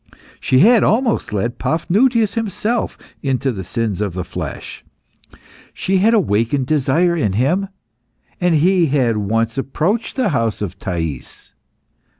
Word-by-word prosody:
She 130 - +3
had 225 +3 +6
almost 225 - +1
led 110 +4 -2
Paphnutius 215 +7 +1
himself 225 +1 -2 0.2
into 135 -1 0
the 95 -5 -6
sins 105 +1 -2
of 100 -4 -2
the 90 0 -3
flesh. - - -7 0.9
She 190 0 0
had 220 +5 +4
awakened 130 - +1
desire 155 +5 +2
in 105 - 0
him, 155 - +1 0.7
and 180 -2 +2
he 175 +2 +3
had 130 -6 +1
once 115 +4 -1
approached 165 - -1
the 255 -6 +1
house 115 - -1
of 95 -2 -5
Thais. 80 -7 -5
140 Hz, 135 wpm, -18 LUFS, -, 0.9 s, had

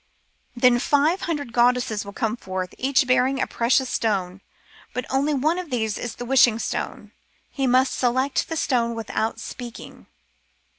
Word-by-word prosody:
Then 240 0 +4
five 295 +7 +2
hundred 285 -7 -3
goddesses 240 -3 +2
will 200 - -9
come 220 +1 -2
forth, 185 -5 -5
each 265 +1 +2
bearing 255 +1 +2
a - - +1
precious 255 +3 +1
stone, 195 -6 -1 0.5
but 250 - -2
only 280 +3 +1
one 310 +6 +1
of 360 -3 -7
these 220 -5 -1
is 240 -2 -5
the 245 - -6
Wishing 240 -3 +5
stone. - - -4 0.4
He 270 -2 -1
must 255 +2 +3
select 260 +4 0
the 325 - -3
stone 235 -5 0
without 225 0 -2
speaking. 240 -2 -9
250 Hz, 155 wpm, -23 LUFS, 230-270 Hz, 0.5 s, Wishing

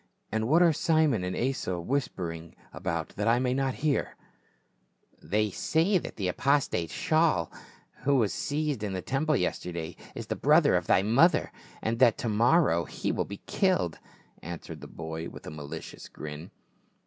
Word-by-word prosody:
"And 110 +1 0
what 165 +6 +5
are 170 -2 +5
Simon 155 - +2
and 90 0 -2
Asa 120 -8 -1
whispering 85 - -3 0.2
about 85 -1 -3
that 105 +1 -1
I 115 +1 +5
may 125 0 +1
not 135 -1 0
hear 145 -2 0 0.5
?" - - -39
"They 105 0 +2
say 170 - +2
that - - -8
the 95 - -2
apostate, 130 - +1
Shaul, 155 - +1 0.5
who 140 +2 +2
was 110 -6 +2
seized 145 -4 -2
in 105 -2 -3
the 95 -1 -4
temple 150 +3 +1
yesterday 85 -5 -3 0.2
is - - -5
the - - -3
brother - - +4
of - - +1
thy 95 - +4
mother, 130 - +4 0.3
and 115 +1 -1
that 120 -4 +5
to 115 - -2
morrow 110 - +3
he - - -3
will - - -1
be 100 0 -9
killed," 185 - +1 0.4
answered 85 0 -8
the - - -8
boy 80 0 -6
with - - -12
a - - -6
malicious 75 -2 -8
grin. 75 +3 -8
110 Hz, 170 wpm, -28 LUFS, 85-140 Hz, 0.5 s, what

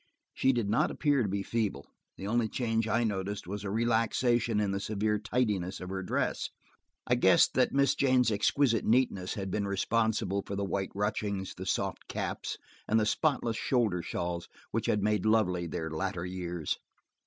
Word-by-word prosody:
She 135 - +3
did 120 -5 0
not 105 - +2
appear 145 -3 +2
to 105 - 0
be 100 +1 -1
feeble; 105 -10 -2 0.3
the 95 - -6
only 115 +1 +1
change 115 -2 0
I 115 +1 +2
noticed 100 -1 -2
was 100 +3 -5
a 100 - -3
relaxation 115 +1 +2
in 105 -2 +1
the 100 - -1
severe 105 +1 0
tidiness 105 -5 -1
of 90 - -7
her 95 0 -3
dress. 90 - -1 0.6
I - - +2
guessed - - +5
that - - +3
Miss 140 0 +3
Jane's 130 -3 +3
exquisite 115 +3 +2
neatness 110 -6 +1
had 95 -2 -4
been 100 0 -1
responsible 100 0 0
for 100 - -5
the 100 0 -1
white 95 0 -2
ruchings, 100 -1 -2
the - - -7
soft - - -2
caps, - - -3 0.3
and 110 - +3
the 110 - +2
spotless 120 -1 +1
shoulder 110 -10 +1
shawls 85 0 -4 0.2
which - - -1
had 105 -1 +1
made 105 0 +1
lovely 90 -6 +2
their 80 -1 -4
latter 90 +1 -2
years. 90 -3 -3
105 Hz, 175 wpm, -30 LUFS, 95-115 Hz, 0.6 s, guessed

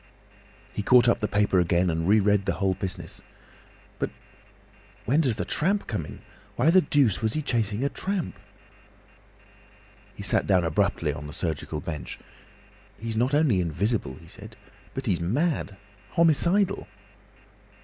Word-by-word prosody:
He - - -2
caught 120 +3 +5
up 120 - +3
the 105 - 0
paper 100 -2 +2
again, 85 +1 +2
and 80 +1 -2
re 105 +2 +5
read 100 -1 +2
the - - +2
whole 95 -1 +1
business. 95 0 -5 0.8
"But - - -1 1.0
when 140 +8 +3
does 130 -8 +1
the - - -3
Tramp 195 +6 0
come 100 -10 -3
in? - - -11 0.3
Why 145 +7 +3
the 185 +1 +6
deuce 140 - +2
was 110 0 0
he 155 - -2
chasing 115 -2 0
a 140 - +1
tramp?" 190 +1 -3 1.8
He - - -8
sat - - +1
down 90 -2 +4
abruptly 80 -2 0
on 75 0 -7
the 75 - -9
surgical 80 -2 -3
bench. 75 -3 -5 0.8
"He's 115 0 -4
not 125 +5 +1
only 140 -12 +3
invisible," 90 - -1
he 85 - -15
said, - - -11 0.4
"but 135 - -4
he's 95 -7 0
mad! 120 - -1 0.4
Homicidal!" 175 +5 +2
105 Hz, 150 wpm, -26 LUFS, 90-140 Hz, 1.8 s, the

